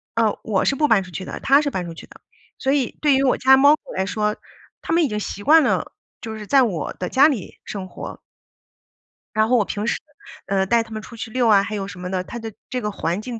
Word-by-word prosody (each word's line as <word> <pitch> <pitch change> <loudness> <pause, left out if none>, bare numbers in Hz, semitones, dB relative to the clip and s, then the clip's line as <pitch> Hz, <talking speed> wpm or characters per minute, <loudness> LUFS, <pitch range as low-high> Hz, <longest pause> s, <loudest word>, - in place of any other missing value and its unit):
呃， 225 -2 +1
我 200 -4 0
是 275 - +1
不 300 - +3
搬 215 -7 +4
出 180 - -13
去 185 +2 -6
的， - - -6
他 275 +2 +5
是 295 - -1
搬 185 -9 -3
出 170 - -7
去 165 - -12
的， - - -17 0.4
所 265 - 0
以 275 -4 0
对 295 -2 +4
于 270 - +2
我 260 - +3
家 265 +1 +6
猫 285 +3 +6
狗 - - -28 0.2
来 190 - +1
说， 210 +1 -1 0.4
它 - - -3
们 335 0 +4
已 295 - +1
经 210 -1 -2
习 205 -1 -6
惯 315 +4 +6
了， - - 0 0.3
就 220 -2 -6
是 210 -1 -9
在 275 +2 +5
我 185 -10 -2
的 180 - -5
家 275 +3 +6
里 250 - -4
生 195 -3 -6
活。 - - -8 1.2
然 215 0 +3
后 250 +2 +3
我 215 - +2
平 205 +2 -4
时， - - +1 0.5
呃， 195 -1 +1
带 230 +4 +2
他 225 - -17
们 215 0 -5
出 230 - -12
去 225 - -6
遛 250 -1 +1
啊， 205 -3 +5
还 215 +1 -4
有 195 -2 -3
什 180 -2 -10
么 180 0 -5
的， 185 -1 -2
它 235 - -8
的 225 -1 -6 0.2
这 255 -1 -3
个 210 - -2
环 180 -1 -2
境 235 0 -6
220 Hz, 285 characters per minute, -22 LUFS, 195-265 Hz, 1.2 s, 家